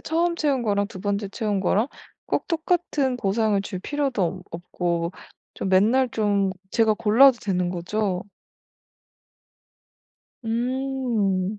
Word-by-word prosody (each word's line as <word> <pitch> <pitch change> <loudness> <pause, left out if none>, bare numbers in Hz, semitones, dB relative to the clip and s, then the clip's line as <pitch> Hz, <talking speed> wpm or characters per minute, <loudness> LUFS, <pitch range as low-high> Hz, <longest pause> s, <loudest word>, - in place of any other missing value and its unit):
처음 340 +2 0
채운 285 -6 0
거랑 200 -2 0
2 185 - -9
번째 200 0 -1
채운 205 -1 -2
거랑 205 +5 +2 0.4
꼭 - - -1
똑같은 320 -6 0
보상을 210 -1 +1
줄 190 -2 -5
필요도 275 0 -1
없 180 +1 -2
없고 170 0 -2 0.4
좀 190 - -3
맨날 225 +8 +4
좀 205 -3 +1 0.2
제가 220 -2 +3
골라도 230 +4 +5
되는 180 -3 -1
거죠? 185 +1 -2 2.2
음. 230 -5 -1
210 Hz, 205 characters per minute, -24 LUFS, 190-260 Hz, 2.2 s, 골라도